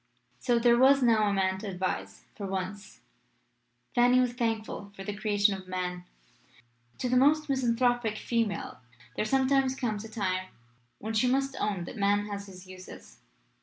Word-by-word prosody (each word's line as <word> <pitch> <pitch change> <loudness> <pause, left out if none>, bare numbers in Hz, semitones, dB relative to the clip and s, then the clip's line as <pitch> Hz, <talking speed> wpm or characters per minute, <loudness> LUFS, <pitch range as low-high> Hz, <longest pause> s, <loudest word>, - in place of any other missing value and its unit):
So, 240 -2 +2
there 235 0 +4
was 270 +1 +6
now 220 -3 +4
a - - 0
Man 190 -1 0
to 210 - -6
advise. 180 - -4
For 200 -2 -6
once, 195 +2 -5 0.9
Fanny 245 +1 +5
was 250 -1 +1
thankful 225 -4 -3
for 195 - -8
the 205 +1 -4
creation 205 -1 +2
of 190 -1 -8
Man. 180 -1 -4 0.9
To 255 - -2
the 250 - +1
most 300 +4 +4
misanthropic 245 -3 +1
female 230 -3 -2 0.4
there - - -1
sometimes 265 +2 +2
comes 220 -5 -2
a 225 - -9
time 185 -4 -2 0.5
when 220 +2 -5
she 220 +3 +2
must 270 +1 +1
own 200 -4 -1
that 220 - -8
Man 205 0 +2
has 200 -1 -6
his 185 -1 -12
uses. 185 0 -12
215 Hz, 165 wpm, -29 LUFS, 195-245 Hz, 0.9 s, was